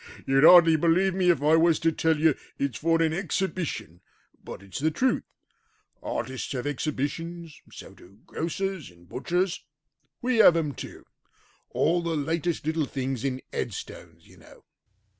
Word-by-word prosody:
"You'd 135 +1 +3
hardly 165 -1 +8
believe 175 +4 +2
me 185 -1 +1
if 155 -5 +2
I 155 +2 +5
was 165 -1 +4
to 165 - +2
tell 160 0 +1
you 155 0 +3 0.2
it's 140 -2 -3
for 165 +1 +2
an 160 -1 +1
exhibition, 175 - -3 0.4
but 100 - -9
it's 95 -3 -7
the 155 +3 +1
truth. 255 +11 0 0.8
Artists 130 +3 -4
have 125 -1 -4
exhibitions: 155 +3 -4
so - - -11
do 95 +3 -19
grocers 185 0 -4
and 85 0 -20
butchers; 175 - -2 0.6
we 250 -1 0
have 195 -6 +7
them 155 -4 -1
too. - - -10 0.6
All 170 +3 +1
the 165 -2 -2
latest 165 +2 -2
little 160 -1 0
things 135 -3 -4
in 130 -1 -3
headstones, - - -7
you - - -19
know." - - -18
160 Hz, 155 wpm, -26 LUFS, 140-170 Hz, 0.8 s, hardly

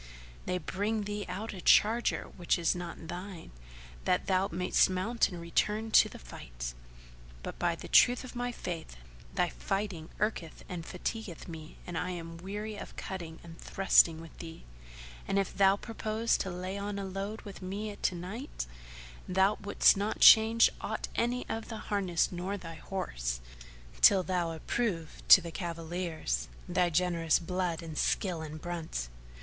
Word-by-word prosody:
they 180 - 0
bring 205 +5 -2
thee 205 0 -4
out 205 +5 -4
a 185 - -7
charger 225 +7 +4
which 175 0 +1
is 170 -2 +2
not 175 -2 -7
thine, 180 - -7 0.5
that - - +2
thou 190 0 +2
mayst 180 +2 +3
mount 205 +6 +1
and 180 -3 -7
return 210 +6 0
to - - +7
the - - -10
fight. - - -7 0.7
But - - -6
by - - +1
the - - -9
truth 245 +1 +5
of 255 - -9
my 245 0 -2
Faith, 170 - -6 0.4
thy 180 -2 +2
fighting 195 -3 -3
irketh 200 -6 -2
and 175 -2 -5
fatigueth 185 -1 -5
me 160 -2 -9
and 175 - -6
I 180 - -2
am 165 -2 -6
weary 205 +4 -5
of - - -9
cutting 170 -4 -6
and 165 -1 -12
thrusting 170 -4 +4
with 165 0 -11
thee; 165 -1 -9 0.6
and 195 - +1
if 195 -1 0
thou 195 0 +5
purpose 225 +1 -1
to 190 - -2
lay 185 +2 -4
on 200 0 -3 0.2
load 200 +3 -4
with 200 -2 -10
me 205 +3 -4
to 185 - 0
night, 190 - -5 0.6
thou 190 +3 +3
wouldst 200 - +5
not 205 +2 -2
change 225 +1 +8
aught - - -3
of 235 -2 -1
thy 225 - -5
harness 190 -6 0
nor 185 +3 -3
thy 165 -3 -8
horse, - - -3 0.6
till 190 -2 +7
thou 180 -2 0
approve 165 -1 -2
to 190 - +10
the 170 -1 -7
cavaliers, 165 - -3 0.2
thy 180 0 +2
generous 170 -1 +2
blood 175 -1 -2
and 160 -2 -5
skill 180 -5 0
in 155 0 -6
brunt." 160 - -4
185 Hz, 160 wpm, -31 LUFS, 165-205 Hz, 0.7 s, to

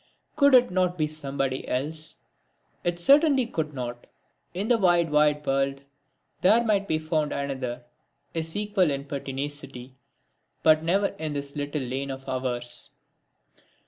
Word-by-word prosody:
Could 280 -2 +6
it 245 -6 +5
not 180 -1 +1
be 155 - +2
somebody 140 -3 -3
else? 155 +4 -4 0.7
It 175 0 0
certainly 275 - +5
could 160 -9 -3
not! 120 -1 -6 0.4
In 195 +4 -3
the 240 -1 +3
wide 175 -4 +3
wide 150 0 +3
world 135 0 0 0.6
there 220 +6 +5
might 205 -3 +1
be 155 - +1
found 155 -1 -1
another, 130 -3 -3 0.5
his 160 0 -2
equal 205 -4 +1
in 140 -1 -3
pertinacity, 140 -2 -6 0.7
but 155 0 +5
never 190 +5 +2
in 155 -2 -3
this 140 0 -5
little 145 0 -3
lane 130 +2 -3
of 135 0 -7
ours. 120 -2 -3
150 Hz, 140 wpm, -26 LUFS, 135-180 Hz, 0.7 s, Could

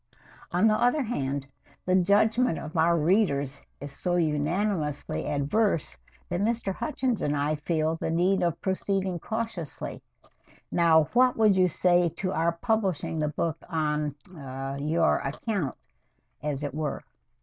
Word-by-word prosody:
"On 180 +5 +3
the 215 - +4
other 255 +4 +3
hand, 140 - -2 0.4
the 185 - +2
judgment 205 +3 +3
of 155 - -7
our 170 +1 +4
readers 150 -5 +1 0.2
is 145 0 -7
so 175 +5 -2
unanimously 155 0 -1
adverse 155 +6 0 0.3
that 175 +1 -2
Mr. 220 -2 0
Hutchins 260 -2 -1
and 145 0 0
I 145 +2 +1
feel 155 +1 -1
the - - -3
need 180 +4 +2
of 170 -3 0
proceeding 190 -1 -1
cautiously. 220 -6 -5 0.7
Now, 165 -2 +5
what 250 0 +4
would 215 -3 +5
you 185 -1 +4
say 175 0 +3
to 185 -1 -2
our 165 +1 +1
publishing 190 -4 -1
the 150 -1 +1
book 165 +2 -2
on 150 -3 -1 0.2
ah 135 -2 -6
on 140 +2 -4
your 165 +1 +3
account, 155 - -3 0.7
as 150 -1 -3
it 145 -2 -3
were?" 150 -1 -3
170 Hz, 145 wpm, -27 LUFS, 150-195 Hz, 0.7 s, Now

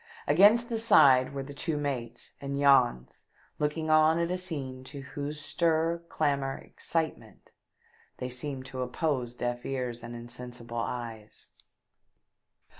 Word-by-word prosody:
Against 220 +5 +6
the 230 -1 -1
side 135 - +6
were 140 -1 -4
the 140 +1 -9
two 150 +2 -2
mates 140 -5 -3
and 140 0 -3
Jans 130 - +3 0.3
looking 155 +1 -1
on 155 +1 +5
at 170 +1 0
a - - +1
scene 140 -8 -2
to 140 +1 -7
whose 145 +2 -5
stir, 165 +2 +1
clamour, 140 -3 0
excite 160 -1 -3
ment, - - -19 0.7
they 125 - -4
seemed 130 +1 -3
to 130 -1 -6
oppose 125 -1 -2
deaf 120 0 -3
ears 125 -3 -3
and 120 0 -8
insensible 120 0 -6
eyes. 115 -3 -6
140 Hz, 135 wpm, -29 LUFS, 125-155 Hz, 0.7 s, Against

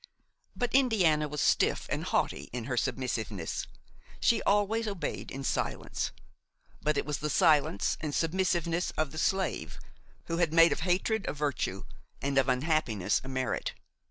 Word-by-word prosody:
But 245 -1 -2
Indiana 190 - +3
was 150 0 -3
stiff - - +2
and - - -1
haughty - - -1
in 125 -1 -4
her 125 +1 -2
submissiveness; 110 -8 -2 0.5
she 235 - +3
always 210 +3 +2
obeyed 200 -4 -4
in 135 +1 -6
silence; 130 - -2 0.7
but 150 -1 +1
it - - 0
was 150 -1 -2
the 150 - -2
silence 145 - +3
and 150 -2 -3
submissiveness 175 0 0
of 155 -3 0
the 160 - -5
slave 190 +3 -1 0.5
who 165 - -2
has 170 -2 +2
made 165 +1 +6
of - - -1
hatred 185 +4 0
a - - -2
virtue 140 -10 -2 0.4
and 140 +1 +1
of 135 0 +2
unhappiness 125 - +1
a - - -9
merit. 130 -1 -2
155 Hz, 155 wpm, -30 LUFS, 135-180 Hz, 0.7 s, made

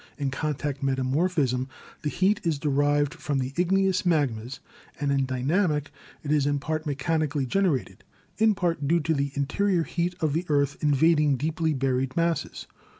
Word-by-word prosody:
In 140 -2 -2
contact 145 -1 -3
metamorphism 135 0 0 0.3
the 150 - -1
heat 190 +7 +1
is 165 -4 0
derived 145 +1 +1
from 145 -4 -3
the 130 0 -2
igneous 190 +1 +2
magmas, 135 -7 0 0.4
and 145 -1 0
in 135 -1 +2
dynamic 150 +3 0 0.3
it 145 - -3
is 145 -2 +2
in 145 0 +1
part 155 +2 -3
mechanically 145 0 -1
generated, 170 -2 -1 0.4
in 220 -1 +4
part 170 -6 -1
due 170 +3 +3
to 160 +2 0
the 140 -1 -1
interior 170 +6 +1
heat 175 +2 -2
of 155 -3 0
the 170 +3 -2
earth 140 -1 +2
invading 150 0 +3
deeply 160 +2 -1
buried 130 0 -1
masses. 170 -2 -1
150 Hz, 155 wpm, -26 LUFS, 140-165 Hz, 0.4 s, in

